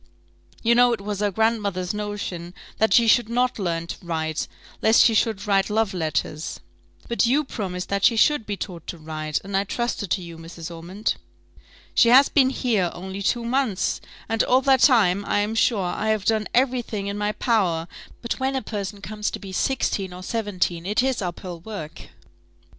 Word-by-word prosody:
You 235 Hz, +1 st, +4 dB
know 245 Hz, 0 st, +5 dB
it 230 Hz, -, -3 dB
was 205 Hz, 0 st, -4 dB
her 205 Hz, 0 st, +1 dB
grandmother's 200 Hz, -3 st, 0 dB
notion 200 Hz, -4 st, -5 dB, 0.2 s
that 220 Hz, -, +3 dB
she 235 Hz, -1 st, +5 dB
should 230 Hz, 0 st, +4 dB
not 250 Hz, 0 st, 0 dB
learn 170 Hz, -3 st, -1 dB
to 170 Hz, -, -8 dB
write, 160 Hz, -2 st, -2 dB, 0.3 s
lest 220 Hz, +1 st, +6 dB
she 230 Hz, -, +4 dB
should 215 Hz, -2 st, +1 dB
write 195 Hz, -1 st, +2 dB
love 215 Hz, -1 st, +1 dB
letters." 155 Hz, -2 st, -2 dB, 0.5 s
"But 235 Hz, 0 st, +2 dB
you 280 Hz, +5 st, +3 dB
promised 185 Hz, -9 st, -5 dB
that 200 Hz, 0 st, -1 dB
she 235 Hz, -, +5 dB
should 250 Hz, 0 st, +3 dB
be 205 Hz, -1 st, -3 dB
taught 175 Hz, -5 st, -7 dB
to 175 Hz, -, -5 dB
write, 155 Hz, -1 st, -3 dB
and 195 Hz, 0 st, -5 dB
I 195 Hz, -, +3 dB
trusted 220 Hz, -1 st, -3 dB
to 185 Hz, -, 0 dB
you, 170 Hz, -1 st, -9 dB
Mrs. 165 Hz, 0 st, -8 dB
Ormond." 185 Hz, +6 st, -3 dB, 0.8 s
"She 230 Hz, -, +5 dB
has 265 Hz, +3 st, +7 dB
been 265 Hz, -3 st, +4 dB
here 225 Hz, -9 st, 0 dB
only 190 Hz, +2 st, -6 dB
two 235 Hz, +4 st, 0 dB
months, 235 Hz, -6 st, 0 dB, 0.3 s
and 225 Hz, 0 st, +1 dB
all 255 Hz, +1 st, +3 dB
that 265 Hz, -1 st, +4 dB
time, 205 Hz, -8 st, +4 dB
I -, -, 0 dB
am 210 Hz, +2 st, -1 dB
sure, 225 Hz, -3 st, +2 dB
I 195 Hz, +4 st, -2 dB
have 215 Hz, -2 st, 0 dB
done 220 Hz, -2 st, +1 dB
every 255 Hz, 0 st, +2 dB
thing 210 Hz, -4 st, -5 dB
in 200 Hz, 0 st, -3 dB
my 210 Hz, 0 st, 0 dB
power; 185 Hz, -10 st, +1 dB, 0.4 s
but 235 Hz, -, -3 dB
when 265 Hz, +1 st, 0 dB
a 265 Hz, -, -1 dB
person 205 Hz, -1 st, -5 dB
comes 210 Hz, 0 st, -3 dB
to -, -, -5 dB
be 195 Hz, -2 st, -9 dB
sixteen 195 Hz, -4 st, -1 dB
or 180 Hz, +1 st, -9 dB
seventeen, 185 Hz, -5 st, -2 dB
it 210 Hz, +4 st, +2 dB
is 265 Hz, -3 st, 0 dB
up 175 Hz, -2 st, -4 dB
hill 175 Hz, -2 st, -7 dB
work." 170 Hz, -4 st, -8 dB
205 Hz, 195 wpm, -24 LUFS, 180-230 Hz, 0.8 s, has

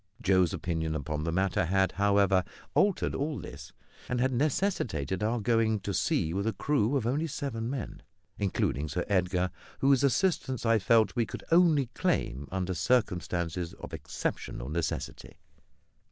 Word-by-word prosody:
Joe's 95 Hz, -6 st, +3 dB
opinion 80 Hz, -2 st, -2 dB
upon 75 Hz, +1 st, -3 dB
the 85 Hz, -, 0 dB
matter 95 Hz, 0 st, +1 dB
had, 95 Hz, +2 st, +2 dB
however, 100 Hz, -2 st, +3 dB, 0.3 s
altered 200 Hz, -2 st, +2 dB
all 145 Hz, +1 st, -2 dB
this, 70 Hz, 0 st, -9 dB, 0.4 s
and 125 Hz, -, 0 dB
had 130 Hz, +2 st, +2 dB
necessitated 125 Hz, -, 0 dB
our 115 Hz, +3 st, 0 dB
going 110 Hz, -1 st, +2 dB
to 100 Hz, -, -3 dB
sea 80 Hz, -2 st, +1 dB
with 100 Hz, +3 st, -1 dB
a 110 Hz, -, +1 dB
crew 140 Hz, -2 st, +1 dB
of 120 Hz, -, -2 dB
only 145 Hz, +7 st, 0 dB
seven 130 Hz, -6 st, -3 dB
men, 130 Hz, -4 st, -5 dB, 0.4 s
including 80 Hz, -7 st, 0 dB
Sir 90 Hz, -, -2 dB
Edgar, 90 Hz, -2 st, +1 dB, 0.3 s
whose 135 Hz, 0 st, +3 dB
assistance 135 Hz, -, +1 dB
I 115 Hz, -1 st, +4 dB
felt 110 Hz, +4 st, +3 dB
we 115 Hz, -3 st, +1 dB
could -, -, -7 dB
only 165 Hz, -5 st, +5 dB
claim 70 Hz, +3 st, -1 dB
under 95 Hz, 0 st, -1 dB
circumstances 90 Hz, -5 st, 0 dB
of -, -, -10 dB
exceptional -, -, -4 dB
necessity. 80 Hz, +1 st, -4 dB
100 Hz, 150 wpm, -29 LUFS, 90-125 Hz, 0.4 s, only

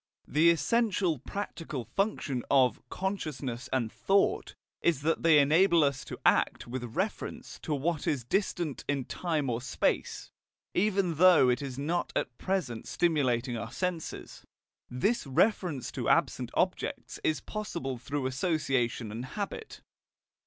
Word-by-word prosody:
The 160 Hz, +3 st, +4 dB
essential 185 Hz, -, +2 dB
practical 165 Hz, -, -5 dB
function 195 Hz, -, -1 dB
of 130 Hz, -3 st, +4 dB
"consciousness" 140 Hz, -10 st, -4 dB
and 120 Hz, -4 st, 0 dB
"thought" 195 Hz, 0 st, +1 dB, 0.3 s
is 160 Hz, -5 st, +1 dB
that 165 Hz, +2 st, +1 dB
they 165 Hz, -2 st, +6 dB
enable 165 Hz, +4 st, +5 dB
us 140 Hz, -2 st, 0 dB
to -, -, -7 dB
act -, -, +3 dB
with 125 Hz, +1 st, -5 dB
reference 200 Hz, +3 st, -3 dB
to 150 Hz, -, -2 dB
what 155 Hz, +2 st, -1 dB
is 140 Hz, -5 st, 0 dB
distant 175 Hz, -, -1 dB
in 140 Hz, -3 st, -1 dB
time 160 Hz, -5 st, -1 dB
or 120 Hz, -1 st, -1 dB
space, 125 Hz, -, -1 dB, 0.4 s
even 190 Hz, -4 st, +1 dB
though 175 Hz, -7 st, +7 dB
it 125 Hz, +2 st, +1 dB
is 135 Hz, -3 st, -5 dB
not 165 Hz, +5 st, -1 dB
at 125 Hz, -, -1 dB
present 175 Hz, -13 st, -2 dB
stimulating 130 Hz, -7 st, +1 dB
our 115 Hz, 0 st, -5 dB
senses. 180 Hz, 0 st, -4 dB, 0.5 s
This 155 Hz, -, 0 dB
reference 155 Hz, -, +1 dB
to -, -, -2 dB
absent -, -, +2 dB
objects -, -, -1 dB
is 155 Hz, -3 st, +1 dB
possible 170 Hz, -, -4 dB
through 140 Hz, +2 st, -3 dB
association 130 Hz, -, 0 dB
and 115 Hz, +3 st, -5 dB
habit. 205 Hz, -, -6 dB
150 Hz, 135 wpm, -30 LUFS, 130-180 Hz, 0.5 s, though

